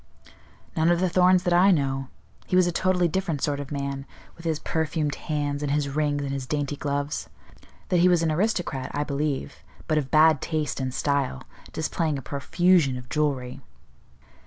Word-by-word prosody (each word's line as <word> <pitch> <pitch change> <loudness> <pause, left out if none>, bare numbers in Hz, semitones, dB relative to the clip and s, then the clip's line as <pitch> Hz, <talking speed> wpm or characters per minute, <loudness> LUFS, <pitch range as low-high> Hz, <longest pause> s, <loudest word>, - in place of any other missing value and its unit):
"None 160 +1 +3
of 175 0 +3
the 185 0 +1
Thorns 180 +1 +4
that 175 -2 +1
I 180 +3 +6
know. 135 -6 +1 0.4
He 180 - 0
was 185 -1 +5
a 175 - 0
totally 180 0 +2
different 170 -4 -2
sort 145 -1 0
of 145 0 -7
man, 140 -1 -4 0.3
with 170 - -14
his 160 -2 0
perfumed 155 -1 -1
hands, 145 -2 -3
and 145 -1 -1
his 145 -1 0
rings, 145 0 0
and 140 - -3
his 135 -2 -4
dainty 145 0 -2
gloves. 145 +1 -3 0.6
That 180 -3 +3
he 180 +1 +5
was 175 -2 +3
an 160 - +1
aristocrat 170 -7 -1
I 145 - 0
believe, 145 -1 -2 0.3
but 155 -1 +2
of 135 -3 -4
bad 155 -2 +5
taste 155 -3 -2
and 130 -1 -2
style, 140 - -1 0.3
displaying 155 -1 -1
a 135 - -7
profusion 145 +1 +2
of 125 0 -10
jewellery." 135 -4 -1
150 Hz, 185 wpm, -25 LUFS, 140-170 Hz, 0.6 s, I